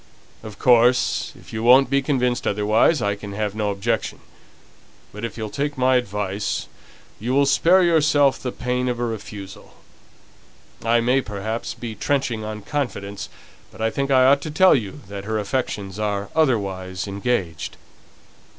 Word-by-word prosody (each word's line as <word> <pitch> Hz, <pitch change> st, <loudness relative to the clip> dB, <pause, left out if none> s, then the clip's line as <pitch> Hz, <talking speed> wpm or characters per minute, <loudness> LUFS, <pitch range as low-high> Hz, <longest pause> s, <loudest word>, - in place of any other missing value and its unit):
"Of 110 Hz, -2 st, -10 dB
course, 125 Hz, 0 st, +3 dB
if -, -, -15 dB
you 110 Hz, -, -3 dB
won't 125 Hz, +4 st, +6 dB
be 140 Hz, 0 st, +3 dB
convinced 125 Hz, -3 st, 0 dB
otherwise, 105 Hz, +9 st, +2 dB
I 100 Hz, 0 st, +1 dB
can 100 Hz, 0 st, -8 dB
have 105 Hz, -1 st, -2 dB
no 105 Hz, -1 st, -1 dB
objection. 105 Hz, +3 st, -2 dB, 0.9 s
But 105 Hz, +2 st, -9 dB
if 115 Hz, -, -5 dB
you'll 110 Hz, -2 st, -5 dB
take 145 Hz, 0 st, -2 dB
my 130 Hz, 0 st, +3 dB
advice, 105 Hz, -3 st, -2 dB, 0.5 s
you 125 Hz, +5 st, -1 dB
will 140 Hz, 0 st, +4 dB
spare 180 Hz, +6 st, +4 dB
yourself 150 Hz, -5 st, +3 dB
the 125 Hz, -, -3 dB
pain 125 Hz, 0 st, -2 dB
of 120 Hz, -1 st, -2 dB
a 120 Hz, -, 0 dB
refusal. 105 Hz, -3 st, -8 dB, 1.1 s
I 115 Hz, +1 st, +3 dB
may, 125 Hz, +3 st, +2 dB
perhaps, 110 Hz, +1 st, -4 dB
be 115 Hz, -2 st, -6 dB
trenching 120 Hz, -1 st, -1 dB
on 105 Hz, -1 st, -6 dB
confidence, 105 Hz, -7 st, -4 dB, 0.4 s
but -, -, -16 dB
I 110 Hz, 0 st, 0 dB
think 140 Hz, +3 st, -2 dB
I 130 Hz, -1 st, +5 dB
ought 140 Hz, +1 st, +5 dB
to 155 Hz, -, -5 dB
tell 185 Hz, +5 st, +5 dB
you 120 Hz, +3 st, -2 dB
that 100 Hz, 0 st, -7 dB
her 110 Hz, +1 st, -1 dB
affections 105 Hz, -3 st, -3 dB
are 100 Hz, -1 st, -2 dB
otherwise 95 Hz, -, 0 dB
engaged." 100 Hz, -5 st, -2 dB
115 Hz, 160 wpm, -22 LUFS, 105-130 Hz, 1.1 s, won't